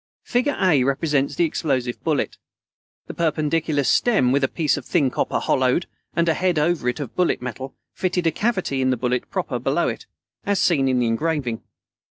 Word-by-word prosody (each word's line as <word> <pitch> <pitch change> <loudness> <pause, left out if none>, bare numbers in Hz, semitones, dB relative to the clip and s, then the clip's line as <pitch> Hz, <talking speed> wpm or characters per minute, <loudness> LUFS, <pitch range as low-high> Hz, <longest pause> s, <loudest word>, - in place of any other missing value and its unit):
Figure 255 +4 0
A 165 -9 +4
represents 140 +1 0
the - - +2
explosive 130 -6 -2
bullet. 155 -3 -1 0.7
The - - -8
perpendicular 155 -2 0
stem, 135 - +3
with 140 +1 +2
a - - +4
piece 155 -1 0
of 145 - -6
thin 140 -2 +1
copper - - -1
hollowed, 130 +6 +1 0.3
and 170 0 +2
a 165 - +4
head 180 +1 0
over 155 -4 +1
it 125 - -3
of 140 -5 -6
bullet 180 -1 +1
metal, 130 +1 -6 0.2
fitted 180 -1 -1
a 165 - +3
cavity 190 - -1
in 130 - +2
the 130 - +1
bullet 125 +1 -1
proper - - -2
below - - +1
it, - - -7 0.4
as 200 -1 0
seen 140 -7 +3
in 130 -1 +2
the 125 - +2
engraving. 125 -1 -1
150 Hz, 190 wpm, -22 LUFS, 130-170 Hz, 0.7 s, A